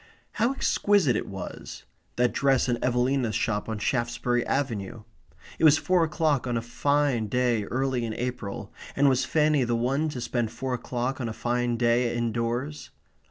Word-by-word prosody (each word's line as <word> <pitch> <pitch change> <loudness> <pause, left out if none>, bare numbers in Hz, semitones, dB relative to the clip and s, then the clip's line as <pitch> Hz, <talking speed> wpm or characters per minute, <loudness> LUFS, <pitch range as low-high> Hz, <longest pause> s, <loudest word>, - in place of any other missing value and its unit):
How 235 +3 +1
exquisite 200 - +2
it - - -2
was 95 -2 -8 0.3
that 125 0 +2
dress 135 -2 +2
in 120 -1 -1
Evelina's 125 -2 +1
shop 110 -3 -1
off 105 -2 -3
Shaftesbury 120 -1 0
Avenue! 115 -5 -2 0.6
It - - -2
was 155 -1 +7
four 180 0 +2
o'clock 155 -4 0
on 120 -1 0
a - - -1
fine 140 -1 +1
day 120 -2 +1
early 130 +1 -1
in 110 -1 -3
April, 120 -4 -5 0.2
and 140 +1 +4
was 130 -2 +3
Fanny 150 -3 +2
the 120 -1 0
one 135 +7 0
to 135 - -5
spend 120 -2 -2
four 130 +3 -4
o'clock 125 +2 -3
on 120 - -2
a - - -4
fine 120 +1 -1
day 120 0 +2
indoors? 120 +5 -2
125 Hz, 165 wpm, -26 LUFS, 115-135 Hz, 0.6 s, was